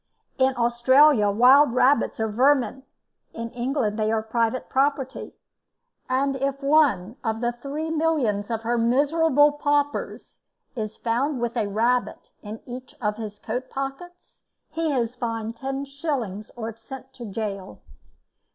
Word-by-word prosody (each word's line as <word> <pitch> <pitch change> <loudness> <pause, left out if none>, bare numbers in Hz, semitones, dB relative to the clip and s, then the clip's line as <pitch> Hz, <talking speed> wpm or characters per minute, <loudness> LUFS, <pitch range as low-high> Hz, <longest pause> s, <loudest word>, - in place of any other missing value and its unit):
In 260 0 +3
Australia 240 0 +4
wild 250 +5 +6
rabbits 265 0 +3
are 220 - +1
vermin, 265 +4 +2 0.5
in 230 0 -6
England 240 -3 -1
they 215 0 +1
are 220 -1 0
private 230 +2 -1
property; 270 -1 -1 0.7
and 270 +2 +1
if 275 +1 -2
one 275 -8 +2
of 225 -2 -1
the 240 0 0
three 285 +6 -5
millions 290 -11 0
of 225 -1 -3
her 235 +1 0
miserable 290 +4 +3
paupers 290 0 -2 0.3
is 220 -2 -5
found 250 +4 -1
with 235 0 -2
a 220 -4 0
rabbit 235 +5 -1
in 215 +1 -8
each 250 +1 -9
of 210 -2 -1
his 210 -2 -7
coat 245 +5 -5
pockets, 275 +7 -7 0.3
he 325 -1 -1
is 240 -4 -1
fined 230 -2 -4
10s. 270 - -4
or 225 -1 -5
sent 260 +3 -11
to 245 - -10
gaol. 200 - -5
250 Hz, 135 wpm, -24 LUFS, 225-275 Hz, 0.7 s, wild